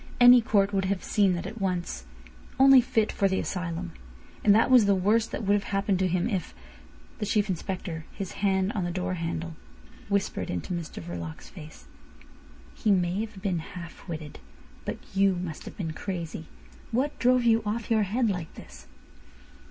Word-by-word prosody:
Any 245 0 +9
court 205 -2 +2
would 195 -1 +1
have 190 0 -1
seen 200 -3 +2
that 175 - -4
at 215 +2 -7
once. 175 - -2 0.5
Only 270 -1 +8
fit 225 -3 +1
for 200 - +2
the 190 0 0
asylum. 170 - -3 0.5
And 205 -1 +6
that 230 +4 +3
was 245 -4 +7
the 200 -1 +4
worst 215 +5 +2
that - - -4
would've 205 0 +2
happened 195 -1 0
to 190 - +2
him 180 0 0
if—" 190 - -3 0.6
The - - -1
Chief 210 0 +1
Inspector, 180 -2 -4
his 195 -2 -6
hand 190 -1 +2
on 210 -6 -2
the 175 - -1
door 185 +1 -2
handle, 165 -1 -4 0.5
whispered 200 -1 -1
into 90 - -3
Mr 170 - -5
Verloc's 85 -2 -7
face. 155 -4 -12 0.9
"He 220 - -1
may've 195 +3 0
been 185 -4 0
half 170 +2 -10
witted, 155 -3 -7 0.5
but - - -3 0.2
you 195 -1 +4
must 175 -3 -6
have - - -9
been 165 -5 -3
crazy. 165 -4 -5 0.4
What 265 +6 -1
drove 250 0 +4
you 230 -1 +4
off 215 +2 -3
your 220 -1 +4
head 225 +5 +1
like 180 -6 -3
this?" 65 - -13
190 Hz, 175 wpm, -27 LUFS, 175-210 Hz, 0.9 s, Any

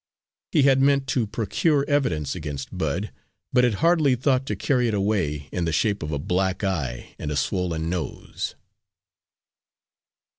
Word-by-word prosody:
He 150 -5 +4
had 135 -1 +5
meant 140 0 +3
to 120 -5 +1
procure 140 - +1
evidence 85 - +1
against 75 -6 -6
Bud, 100 +5 -2 0.4
but 125 - +5
had 120 -4 +3
hardly 160 -6 +4
thought 130 +1 +1
to 105 - -1
carry 125 +5 +1
it 110 - 0
away 90 -9 0
in 90 - -1
the 80 - 0
shape 100 +6 +1
of 75 -1 -4
a 70 - -1
black 95 +6 -1
eye 90 -9 -2
and - - -3
a 75 - -2
swollen 80 +2 -1
nose. 85 -1 -4
100 Hz, 155 wpm, -24 LUFS, 80-130 Hz, 0.4 s, had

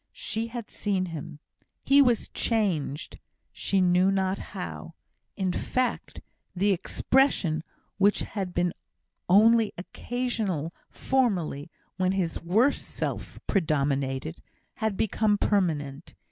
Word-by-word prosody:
She 230 - -2
had 230 -1 -7
seen 195 -3 -1
him. 150 -1 -7 0.5
He 280 +1 +6
was 245 -4 +3
changed, 175 - -1 0.3
she 195 -1 0
knew 180 +1 +4
not 190 0 0 0.2
how. - - -6 0.4
In 190 -3 0
fact, 255 +4 -2 0.3
the 200 +3 +2
expression, 180 - +1 0.4
which 200 +1 +4
had 195 -3 -4
been 175 0 0 0.6
only 220 +3 +6
occasional 200 - -3 0.2
formerly, 180 - 0 0.3
when 185 0 +1
his 180 -4 -1
worse 220 +12 +2
self - - -4
predominated, 140 - 0 0.4
had 220 -3 -1
become 215 -1 +2
permanent. 160 -8 -1
190 Hz, 105 wpm, -27 LUFS, 165-220 Hz, 0.6 s, He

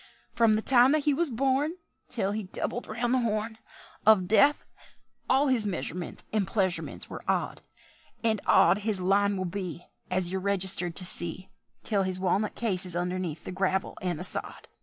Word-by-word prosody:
"Frum 225 -2 +3
the 215 - -2
time 255 +1 +5
that 310 -1 +1
he 295 - +2
was 335 +3 0
born 270 +6 0 0.3
Till 200 -5 -2
he 215 +1 -3
doubled 210 +5 -5
round 235 +3 -2
the 260 - +3
Horn 220 -1 -2 0.4
Of 205 -4 +4
Death, 280 +8 +3 0.6
all 270 +2 +3
his 250 -6 +1
measurements 175 -1 -4
and 210 -3 0
pleasurements 185 -4 -2
were - - -8
odd; - - -2 0.6
And 220 -3 0
odd 200 - +4
his 210 -2 -2
line 200 +2 +1
will 185 - -3
be, 175 -2 -6 0.2
As 185 -1 +3
you're 190 0 -3
registered 190 -3 +4
to 185 - -3
see, 175 +2 +2 0.3
Till 205 -3 0
his 185 -1 -1
walnut 195 +3 -1
case 195 -6 0
is 180 -2 0
underneath 175 -3 -3
the - - -5
gravel 190 0 -2
and 180 -3 -2
the 175 - -6
sod." - - -1
200 Hz, 180 wpm, -27 LUFS, 185-230 Hz, 0.6 s, time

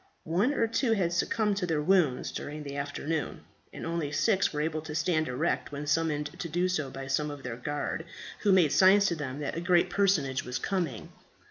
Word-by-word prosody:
One 185 - +2
or 230 - +2
two 230 +1 +1
had 180 -5 0
succumbed 210 +3 +1
to 180 -3 -1
their 160 -3 0
wounds 170 -7 +2
during 150 +1 -6
the 140 -1 -6
afternoon, 145 +2 -3 0.3
and - - -7
only 165 -3 -2
six 190 +7 +2
were 150 - -2
able 155 0 -1
to 150 -1 -7
stand 155 0 +1
erect 125 +2 -1
when 145 +1 -5
summoned 150 -1 -1
to 170 - -4
do 175 +3 +1
so 155 -7 -1
by 135 0 -7
some 135 +3 0
of 145 -2 -8
their 125 -2 -4
guard, 145 +5 -3 0.3
who 205 - +2
made 180 -6 +5
signs 195 +2 +6
to 170 - -1
them 140 -4 -5
that 145 - -3
a 165 - -3
great 175 0 +3
personage 160 -10 +2
was 125 0 -3
coming. 160 - -3
155 Hz, 210 wpm, -29 LUFS, 145-180 Hz, 0.3 s, signs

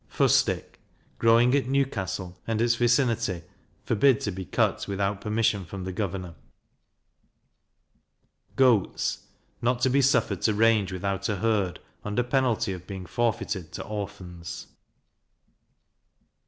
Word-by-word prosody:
Fustic - - +1 0.4
growing 115 +2 +5
at 140 -3 +2
Newcastle, 105 -9 -1
and 115 -1 0
its 120 +1 +3
vicinity, 115 -6 +1 0.4
forbid 120 +2 +3
to 105 - -2
be 95 0 -6
cut - - 0
without 100 0 -1
permission 105 -2 +1
from 95 +3 -7
the 95 - -4
governor. 90 -3 -4 2.2
Goats 125 -7 +2 0.3
not 120 +1 +1
to 130 - +3
be 140 +2 +4
suffered 125 -4 +2
to 110 - +2
range 110 -3 +3
without 95 +1 -2
a 105 - 0
herd, 100 -4 0 0.2
under 105 +4 0
penalty 125 -5 +1
of 90 -1 -9
being 95 -2 -6
forfeited 100 -5 -2
to - - -5
Orphans. 95 -4 -7
105 Hz, 120 wpm, -26 LUFS, 95-120 Hz, 2.2 s, growing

